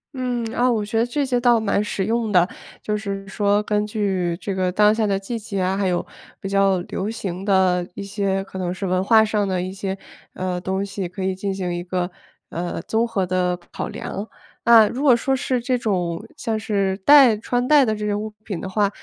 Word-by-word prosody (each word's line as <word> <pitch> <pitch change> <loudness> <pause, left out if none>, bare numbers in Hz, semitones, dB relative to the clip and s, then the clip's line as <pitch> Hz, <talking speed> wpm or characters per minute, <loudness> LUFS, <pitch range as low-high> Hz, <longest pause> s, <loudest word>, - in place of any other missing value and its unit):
嗯。 250 -2 -2
啊， 250 +1 +2
我 215 -3 0
觉 225 +2 -1
得 235 - +3
这 280 +4 -1
些 250 -2 +1
倒 240 -1 +4
蛮 205 -1 +1
实 195 -2 -2
用 225 -1 0
的， 180 -1 +4 0.3
就 210 - -2
是 195 -2 -5
说 205 +1 +1
根 210 0 0
据 190 -5 -1
这 195 +2 -3
个 185 -1 0
当 210 +3 +4
下 220 -1 0
的 195 -1 +1
季 215 +4 -4
节 200 -3 -4
啊， 185 +1 +1
还 200 -1 +1
有 175 -1 0 0.3
比 195 - -5
较 195 -2 +3
流 195 +3 -4
行 195 -4 -5
的 185 -3 +2
一 200 - -5
些 195 -1 -1
可 190 -1 -8
能 180 -1 -2
是 195 +1 -5
文 185 0 +1
化 220 +1 +6
上 210 -2 0
的 185 -1 -1
一 185 - -4
些， 195 0 -4 0.4
呃， 185 -1 -3
东 190 +2 -2
西， 195 -2 -4
可 185 +2 -6
以 190 - 0
进 195 +1 -3
行 180 -2 -3
一 175 - -3
个， 180 0 -2 0.4
呃， 175 0 -4
综 225 +2 0
合 195 -5 -1
的 180 0 0
考 - - -4
量。 205 +3 -6 0.4
那 230 -2 +8
如 255 - -4
果 260 -4 +6
说 265 +3 0
是 255 -1 -1
这 250 +1 0
种， 180 -7 -1
像 225 -2 -2
是 200 -3 0
戴 260 +1 +7
穿 245 +3 -1
戴 295 -2 +6
的 220 -4 +1
这 210 0 -4
些 210 - 0
物 215 +1 -3 0.2
品 190 -6 -4
的 190 - -5
话， 205 +1 +2
200 Hz, 245 characters per minute, -22 LUFS, 185-220 Hz, 0.4 s, 那